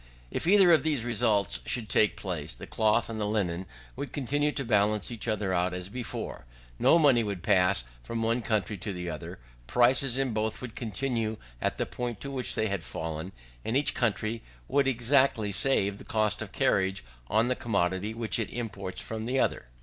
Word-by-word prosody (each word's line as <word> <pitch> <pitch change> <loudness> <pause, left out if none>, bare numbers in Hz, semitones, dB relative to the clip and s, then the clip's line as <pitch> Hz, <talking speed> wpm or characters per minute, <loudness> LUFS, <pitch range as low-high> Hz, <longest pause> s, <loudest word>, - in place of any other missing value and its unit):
If - - -3
either 190 -2 +7
of 160 -4 +6
these 145 -6 0
results 100 - +2
should 115 - -1
take 105 0 +3
place, 80 -5 -4
the - - -8
cloth 110 +1 +2
and 110 -1 -4
the 105 - 0
linen 95 -4 -1 0.3
would 140 +2 -5
continue 145 +2 0
to 140 -2 -4
balance 105 -1 +2
each 115 0 -4
other 105 -4 0
as 90 +1 -1
before: 115 - -6 0.3
no - - +6
money 140 -7 +5
would 100 -5 -4
pass 90 -9 +3 0.2
from 115 - -3
one 115 +2 +1
country 105 -3 -1
to 100 +3 -5
the 90 -1 -4
other; 75 - -7 0.3
prices 125 +1 +3
in 135 -3 0
both 110 0 -1
would 120 -3 -8
continue 115 -1 -2 0.2
at - - -1
the - - 0
point 120 -3 -4
to 140 - -5
which 130 -2 0
they 110 - +1
had 100 -5 -2
fallen, 80 +3 -5 0.3
and 115 - 0
each 145 - +1
country 115 -1 -1 0.3
would 140 -1 +2
exactly 125 -3 +2
save 100 -3 +3
the - - -10
cost 110 -2 +1
of - - -6
carriage 95 -5 +1 0.2
on 110 - +2
the 125 - +1
commodity 100 -2 -1
which 115 -2 -1
it 110 - -1
imports 100 -6 -5
from 110 0 -5
the 130 +2 0
other. 65 - 0
110 Hz, 190 wpm, -28 LUFS, 100-125 Hz, 0.3 s, either